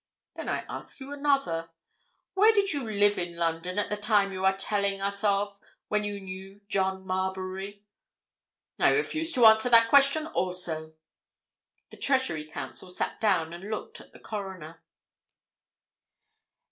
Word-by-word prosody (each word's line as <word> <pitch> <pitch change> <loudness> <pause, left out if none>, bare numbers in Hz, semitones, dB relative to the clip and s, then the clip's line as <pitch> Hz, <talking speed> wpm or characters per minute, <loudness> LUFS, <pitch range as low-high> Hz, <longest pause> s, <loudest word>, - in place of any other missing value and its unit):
"Then - - -5
I - - -2
ask - - -8
you 275 +1 -7
another. 275 - 0 0.6
Where 415 +3 +6
did 400 -4 +2
you 270 -6 -3
live 205 -1 +3
in 175 -1 -4
London 170 +2 -2
at 205 - -1
the - - +1
time 205 -1 +2
you 185 0 -5
are 190 0 +3
telling 200 0 0
us 200 +1 -3
of, 200 0 0 0.3
when 210 0 +1
you 205 -1 -4
knew 190 +1 -9
John 190 -1 -1
Marbury?" 190 +2 -4 1.0
"I - - +5
refuse 325 -6 0
to 245 -3 +4
answer 220 +2 +7
that 230 -1 +6
question 280 +3 +5
also!" 175 - -2 1.0
The - - -12
Treasury 260 - +1
Counsel 155 +3 -8
sat 180 - -3
down 175 -7 +1
and 185 +4 -8
looked 215 - -5
at - - -17
the - - -15
Coroner. 190 -6 -7
200 Hz, 145 wpm, -28 LUFS, 185-225 Hz, 1.0 s, answer